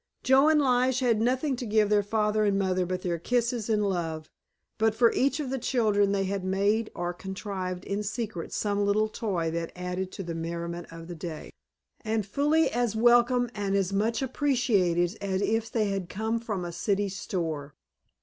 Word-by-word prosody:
Joe 270 +3 +5
and 310 -1 +4
Lige 255 -1 +2
had 230 -4 +2
nothing 260 +4 +1
to 250 - -5
give 210 -1 +3
their 210 -1 +5
father 210 +1 +1
and 200 -1 +2
mother 185 -2 0
but 185 0 -3
their 170 -2 -1
kisses 235 +3 0
and 210 -2 +2
love, 165 -4 -3 0.5
but 220 0 +2
for 235 0 +5
each 275 +3 +1
of 275 -4 -3
the 270 - -1
children 215 -5 +2
they 200 -1 +1
had 195 0 -2
made 200 +4 +1
or 175 0 -2
contrived 190 -1 -5
in 200 +1 -2
secret 210 -4 -4
some 205 -1 0
little 205 +2 +2
toy 190 -7 -2
that 165 0 -3
added 180 +1 -4
to 195 - -5
the 170 -1 -5
merriment 170 +1 -4
of 165 0 -9
the 175 - -6
day, 160 -1 -7 0.5
and 220 -2 -1
fully 295 +9 +2
as 240 -3 0
welcome 240 +1 +4
and 200 -2 -1
as 195 -1 0
much 225 +5 0
appreciated 225 - +1
as 190 -1 -1
if 225 +1 0
they 215 -3 +1
had 195 -3 -3
come 220 +3 -1
from 210 -6 -4
a 175 - -4
city 200 +3 0
store. 165 -7 -4
205 Hz, 190 wpm, -28 LUFS, 185-235 Hz, 0.5 s, Joe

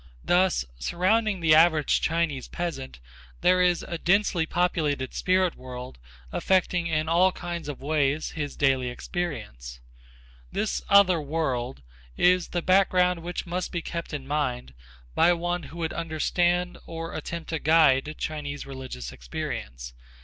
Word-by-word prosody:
Thus 180 - +2
surrounding 195 - +1
the 160 -2 +5
average 160 -2 +4
Chinese 160 -5 -1
peasant 160 - -5 0.4
there 185 0 +4
is 180 -1 +2
a 170 - -5
densely 180 -3 +2
populated 155 -7 0
spirit 185 -1 +2
world 125 - -9 0.3
affecting 180 -2 +1
in 155 -1 0
all 175 +3 +4
kinds 170 -4 -6
of 140 - -6
ways 150 0 0
his, 145 -3 -4
daily 130 -3 +2
existence. 105 - -5 0.7
This 215 - -1
other 190 -4 +6
world 135 - -2 0.3
is 180 0 +4
the 175 -1 -3
background 180 -2 +3
which 175 +1 -4
must 180 +1 -3
be 170 -2 -3
kept 170 -1 -5
in 145 -3 -5
mind 130 - -2 0.4
by 175 - +5
one 175 +1 -2
who 165 - -11
would 165 -1 -2
understand 175 +2 0
or 165 0 -6
attempt 165 +1 -6
to 160 - -1
guide 155 -2 +4
Chinese 145 -2 -4
religious 130 - -7
experience. - - -6
165 Hz, 135 wpm, -26 LUFS, 140-175 Hz, 0.7 s, other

